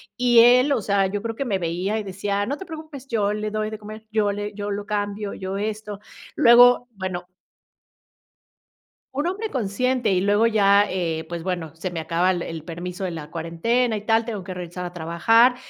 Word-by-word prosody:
y 245 -1 +4
él, 250 +4 +6
o 260 - +2
sea, 200 -1 +2
yo 205 +1 -3
creo 225 +1 -4
que 275 - -2
me 200 -6 0
veía 180 +5 -1
y - - -4
decía: 200 +1 -2
"No 280 +6 -3
te 380 - -8
preocupes, 310 -5 -9
yo 210 -3 +1
le 210 0 -3
doy 215 0 -2
de 215 - -6
comer, 215 +1 -10
yo 215 -2 +1
le 205 +1 -4
yo 205 0 -4
lo 205 0 -4
cambio, 205 0 -3
yo 190 +1 -4
esto". 210 0 -4 0.4
Luego, 245 +1 +7
bueno 185 -2 -5 1.9
un 290 +3 -1
hombre 405 +5 -2
consciente 250 - 0
y 185 -1 +2
luego 205 +3 +3
ya, 205 -2 +4
eh 165 -3 -2
pues 170 -1 -5
bueno, 175 -3 -3
se 180 +3 -4
me 170 - -4
acaba 170 +3 +1
el 175 -2 -2
el 165 -2 -6
permiso 180 +3 -6
de 185 - -2
la 160 -2 -8
cuarentena 215 +9 0
y 205 - -9
tal, 225 0 +3
tengo 215 -5 -5
que 185 0 -6
regresar 180 0 -6
a 175 - -7
trabajar 180 +9 +3
205 Hz, 205 wpm, -23 LUFS, 180-230 Hz, 1.9 s, Luego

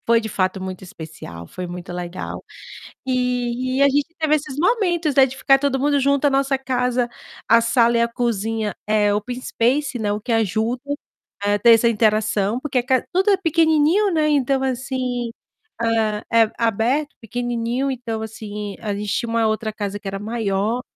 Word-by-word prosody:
Foi 230 0 +5
de 220 -1 -5
fato 185 -1 -1
muito 185 0 -6
especial, 155 - -10
foi 180 - -6
muito 175 0 -7
legal. 175 0 -6 0.6
E 250 0 -1
e - - +4
a 280 - +7
gente 290 +4 0
teve 310 -1 +2
esses 280 -3 -3
momentos, 345 - +1
né, 270 - +7
de 265 0 -8
ficar 270 0 +4
todo 275 -1 0
mundo 290 +1 +2
junto. 280 +1 +2
A - - +4
nossa 270 0 +1
casa, 250 -2 0 0.4
a 230 - +6
sala 235 0 +3
e 235 - +3
a 235 - +2
cozinha 225 -3 -2
é 210 -1 +2
open 245 +5 -3
space, 255 +2 0
né, 210 -2 -1
o 210 - -3
que 230 - -3
ajuda 225 +2 0 0.6
a 205 0 +2
ter 235 +2 +6
essa 230 +1 +4
interação, 215 0 +1
porque 270 -2 -1
a - - +1
ca 260 -2 +2
tudo 380 +3 +3
é 395 - +5
pequenininho, 330 +3 +3
né, 310 -2 +2
então, 275 -2 +2
assim, 255 -2 -2 0.5
hã, 225 -2 +1
é 225 -1 +5
aberto, 235 +7 0
pequenininho, 240 +3 -2
então, 235 -4 -4
assim, 210 -2 -6
a 210 -2 -3
gente 205 0 -4
tinha 235 - -1
uma 230 -1 +2
outra 220 0 -1
casa 205 -1 -4
que 205 - -15
era 195 0 -4
maior 215 +1 -1
235 Hz, 185 wpm, -21 LUFS, 215-270 Hz, 0.6 s, a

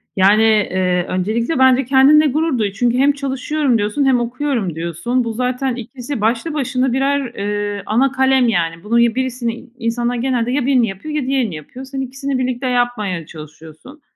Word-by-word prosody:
Yani, 200 +3 +4
eee, 185 -5 +2
öncelikle 225 - -1
bence 260 0 +4
kendinle 280 +4 +5
gurur 305 0 0
duy. 210 -3 0
Çünkü 240 +4 0
hem 275 +2 +4
çalışıyorum 275 -1 -1
diyorsun 210 +7 0
hem 260 -2 +3
okuyorum 240 - -2
diyorsun. 170 +10 -2
Bu 230 -1 -4
zaten 250 +2 -1
2'si 250 +1 -6
başlı 230 +8 0
başına 260 -3 0
birer, 270 -1 0
eee, 205 0 -3
ana 250 +5 +2
kalem, 265 -2 +3
yani. 165 -5 -1
Bunun 230 +3 +1
ya 235 -1 +3
birisini 250 -3 -2
i 250 +2 -14
insanlar 240 +1 -1
genelde 245 -1 -1
ya 265 -1 0
1'ini 255 -4 +3
yapıyor 205 +11 -6
ya 300 - 0
diğerini 260 -9 0
yapıyor. 245 - -10
Sen 270 0 -5
2'sini 270 +1 -3
birlikte 255 0 -2
yapmaya 245 -9 -1
çalışıyorsun. 160 - -13
245 Hz, 175 wpm, -18 LUFS, 215-265 Hz, -, kendinle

